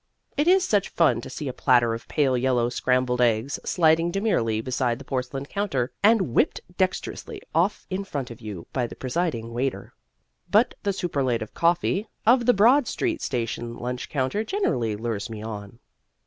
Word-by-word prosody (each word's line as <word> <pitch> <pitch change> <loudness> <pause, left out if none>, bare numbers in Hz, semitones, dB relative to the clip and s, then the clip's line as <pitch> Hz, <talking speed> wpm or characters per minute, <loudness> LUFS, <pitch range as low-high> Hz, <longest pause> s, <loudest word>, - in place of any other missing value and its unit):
It 295 +3 +1
is 375 +1 +5
such 205 -3 +1
fun 125 -9 +2
to - - -8
see 150 - -5
a 130 - -3
platter 120 -3 +3
of 115 - -7
pale 140 -4 +2
yellow 125 -1 +1
scrambled 125 0 +1
eggs 120 +3 +1
sliding 165 0 +3
demurely 175 - 0
beside 125 0 -1
the 135 - -11
porcelain 135 +1 -3
counter 140 -9 -2
and 205 - +4
whipped - - +2 0.2
dextrously 185 0 -2
off 175 +6 +1
in 190 +2 -1
front 140 -9 -5
of 115 - -11
you 100 -7 -7
by 125 -3 0
the - - -10
presiding 130 -5 -2
waiter. 130 +3 -3 0.6
But 220 +4 +4
the 200 - 0
superlative 135 - -1
coffee 175 +5 +1 0.2
of 240 +1 +4
the 245 - +7
Broad 240 +6 +5
Street 340 -3 -1
Station 120 -1 -3
lunch 125 +1 -4
counter 140 +10 -1
generally 130 - 0
lures 110 -1 -3
me 110 -1 -7
on. 105 -1 -7
130 Hz, 170 wpm, -25 LUFS, 120-190 Hz, 0.6 s, the